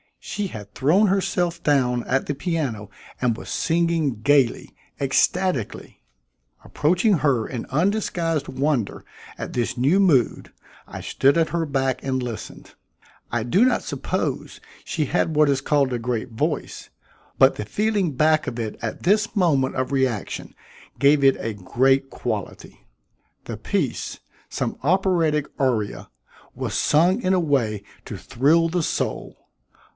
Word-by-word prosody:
She 205 -1 -3
had 105 - -10
thrown 175 +11 +3
herself 180 -3 0
down 125 -5 +2
at 135 +1 0
the 145 - -2
piano 140 - -3 0.3
and 120 -3 0
was - - -9
singing 165 -8 0
gaily, 140 -1 +2 0.2
ecstatically. 140 - 0 0.6
Approaching 180 +4 +2
her 130 -7 +1
in 120 -3 -5
undisguised 165 -2 0
wonder 130 -4 -1 0.3
at - - -6
this 120 0 -1
new 140 +10 +3
mood, 150 - +2 0.4
I - - -8
stood 140 +4 +2
at 165 -1 +2
her 165 +1 -1
back 135 -2 -1
and 130 -1 -1
listened. 120 -3 -7 0.6
I 120 -1 0
do 180 - +3
not 255 - +1
suppose - - -3 0.2
she 160 -6 -2
had 160 +1 0
what 150 -1 +4
is 135 -1 +1
called 140 -2 +1
a 120 - -1
great 120 +1 -3
voice, 110 - -3 0.5
but - - +5
the 105 - -5
feeling 205 - 0
back 155 +3 +2
of 120 - -4
it 110 -2 -4
at 115 - -5
this 210 +4 +2
moment 150 -9 +2
of 130 +1 -2
reaction 130 -6 -2 0.4
gave 140 0 +4
it 135 0 +5
a 115 - -3
great 135 +7 +1
quality. - - -6 0.6
The - - -6
piece - - -2 0.3
some - - -3
operatic 165 -3 +2
aria 120 -6 -1 0.5
was - - -4
sung 175 +9 +3
in 185 -3 +1
a 185 - +3
way 120 - 0 0.2
to - - -6
thrill 145 +6 +2
the 175 0 -1
soul. - - -3
140 Hz, 140 wpm, -23 LUFS, 125-170 Hz, 0.6 s, but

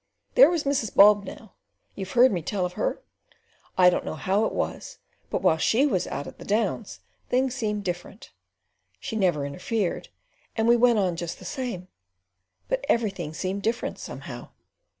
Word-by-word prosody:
There - - +8
was 340 -3 0
Mrs. 275 -7 -1
Bob 205 0 +7
now. 215 +1 -11 0.4
You've 195 -1 -7
heard 250 +2 +6
me 180 -4 -1
tell 185 +3 -2
of 180 - -5
her? 215 - -2 0.7
I 180 -1 +7
don't - - -1
know - - -5
how 195 +7 +1
it - - -1
was, - - -4 0.3
but - - -2
while 160 - +4
she 240 - +3
was 190 -11 0
out 140 - -4
at - - -11
the - - -9
"Downs" 210 0 -1 0.3
things 255 0 +1
seemed 210 -5 -2
different. 175 -2 -6 0.7
She 260 -6 -5
never 175 -9 +1
interfered 180 +7 -2 0.5
and 225 0 +2
we 235 - +6
went 240 -1 +4
on 185 -4 +1
just 170 -1 -4
the 185 - -13
same, 195 -5 -4 0.8
but - - -1
everything 190 -9 0
seemed 190 +4 -3
different 230 +3 -2
somehow." - - -8
205 Hz, 170 wpm, -26 LUFS, 180-235 Hz, 0.8 s, There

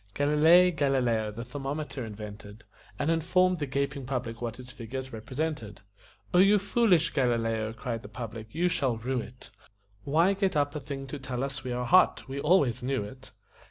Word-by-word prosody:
Galilei 160 +5 +5
Galileo 130 -8 +1
the 115 +3 -6
thermometer 135 +1 -4
invented 105 0 -9 0.3
And 155 - 0
informed 180 +2 +2
the 145 - -2
gaping 140 0 -2
public 120 -3 -3
what 115 -1 -4
its 125 0 -9
figures 130 +1 -7
represented. 115 -3 -4 0.5
"O 180 - +5
you 200 +2 +6
foolish 200 -5 +3
Galileo," 115 -4 0
cried 115 -1 -4
the 100 - -11
public, 110 0 -7
"you 170 +8 0
shall 135 -8 0
rue 125 +2 -2
it! 120 0 -12 0.5
Why 165 - +3
get 195 -2 0
up 145 -1 +1
a 150 - -3
thing 135 0 -6
to 140 +2 -6
tell 130 -1 -4
us 140 0 -4
we 130 - -4
are 125 0 -2
hot? 180 +1 +4
We 135 +1 -5
always 145 -6 +3
knew 130 -2 -1
it." 130 +6 -11
135 Hz, 175 wpm, -28 LUFS, 115-150 Hz, 0.5 s, you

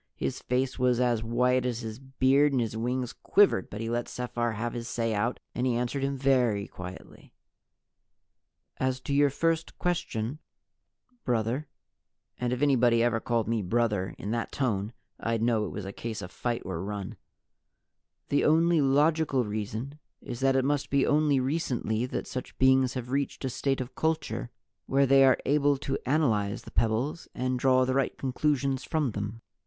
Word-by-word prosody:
His - - -3
face 130 +1 -1
was 125 -1 +3
as 120 -3 +2
white 125 +2 +2
as 125 -2 -2
his 110 0 -6
beard 135 +2 +2
and 130 - +2
his 115 -2 -2
wings 125 +2 -2
quivered, 200 - +3
but 105 - -6
he 115 - -3
let 120 0 -1
Sephar 120 -1 -2
have 115 +2 -3
his 115 -1 -5
say 115 -1 -1
out 110 +4 -1
and 125 +1 0
he 125 - +1
answered 125 +3 -1
him 140 0 -1
very 125 -7 +2
quietly. 90 0 -11 1.4
"As 130 0 0
to 140 - -3
your 145 0 +4
first 165 +3 -1
question, 145 -7 -2 0.8
brother," 120 +5 -1 0.7
(and 125 -1 -1
if 125 +2 -1
anybody 120 -4 +4
ever 120 -1 +2
called 115 -1 -1
me 115 -1 0
"brother" 105 -1 0
in 100 - -5
that 115 0 -2
tone 110 -6 -1 0.3
I'd 115 -1 -1
know 115 -3 +2
it - - -7
was 105 - -6
a 95 - -6
case 115 -1 -5
of 90 - -8
fight 120 -1 -3
or 80 - -4
run) 100 -1 -5 1.1
"the 145 - +2
only 165 +1 +4
logical 145 0 +3
reason 110 +7 -4 0.2
is 120 -2 -7
that 135 0 +3
it 130 -1 +2
must 145 0 0
be 140 -1 +3
only 150 -2 +3
recently 125 -5 -1
that - - -4
such 130 - -6
beings 130 0 +4
have 125 -1 -5
reached 140 0 -2
a 130 - -1
state 135 +2 -1
of 130 0 -5
culture 160 - -1 0.4
where 140 +1 +3
they 135 +1 +6
are 130 -1 +6
able 145 0 +3
to 135 0 -3
analyze 115 -9 +1
the - - -11
pebbles 115 +8 0
and 130 0 -1
draw 130 0 +4
the 130 - 0
right 135 -1 0
conclusions 135 0 0
from 155 -6 0
them. 105 +2 -5
125 Hz, 175 wpm, -28 LUFS, 115-135 Hz, 1.4 s, they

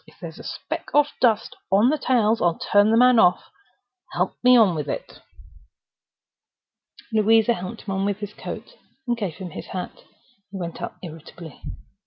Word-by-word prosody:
If - - -20
there's - - -9
a - - -10
speck - - -6
of 295 0 +5
dust 230 -4 +2 0.2
on 205 +6 +5
the 305 - +1
tails, 230 -4 +2
I'll 170 -1 +2
turn 205 +1 +3
the 225 - +3
man 250 -1 +6
off!—Help 365 - -2
me 250 0 +7
on 210 -6 +5
with 150 -2 -4
it." - - -6 1.9
Louisa 220 +1 +4
helped 200 +2 -7
him 195 - -5
on 190 +1 -1
with 200 -1 -1
his 205 0 -7
coat, - - -8 0.3
and 240 - +1
gave 200 -9 -4
him 185 -3 -8
his - - -8
hat. 185 -1 -7 0.5
He 195 - -8
went 170 -2 -6
out - - -5
irritably. 165 -1 -11
210 Hz, 170 wpm, -23 LUFS, 185-235 Hz, 1.9 s, me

